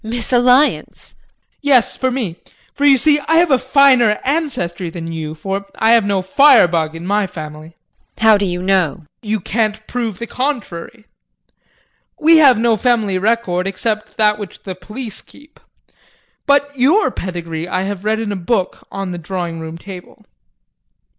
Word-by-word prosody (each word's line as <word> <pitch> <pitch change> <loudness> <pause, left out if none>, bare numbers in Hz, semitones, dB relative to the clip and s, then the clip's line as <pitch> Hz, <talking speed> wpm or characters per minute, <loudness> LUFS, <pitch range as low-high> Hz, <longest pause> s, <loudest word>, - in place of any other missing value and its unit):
Misalliance! 245 +4 +1
JEAN. - - -40
Yes, 275 -5 +3
for 260 - -1
me. 230 -10 -4 0.4
For 285 - -1
you 275 -2 +6
see 295 +3 +3
I 325 - +2
have 340 -1 +4
a 260 - +4
finer 260 -5 +4
ancestry 255 - -2
than 165 0 -7
you, 155 -1 -5
for 195 +5 -5
I 220 +1 +2
have 230 -3 +4
no 195 -2 0
fire 275 +3 +5
bug 160 -2 -2
in 165 +1 -8
my 205 +1 0
family. 155 -1 -10 0.4
JULIE. - - -6
How 215 -1 +7
do 200 - 0
you 180 0 -3
know? 185 -6 +1
JEAN. 155 - -19
You 215 -1 -2
can't 215 0 -2
prove 230 -5 -4
the 235 - -5
contrary. 240 -10 -5 1.1
We 325 +1 +6
have 270 -6 +6
no 230 0 +2
family 215 -6 +1
record 195 -4 0
except 215 +2 -4
that 210 -1 +2
which 205 -2 -9
the 190 - -5
police 215 +4 -8
keep. 295 +1 -20 0.9
But 285 0 +2
your 300 - +3
pedigree 170 -3 -5
I 185 +1 -2
have 195 -1 -5
read 215 +1 0
in 220 -2 -3
a - - -3
book 190 +1 -2
on 195 -2 -5
the 175 - -6
drawing 170 -1 -5
room 160 0 -7
table. 180 +1 -12
210 Hz, 170 wpm, -17 LUFS, 180-250 Hz, 1.1 s, How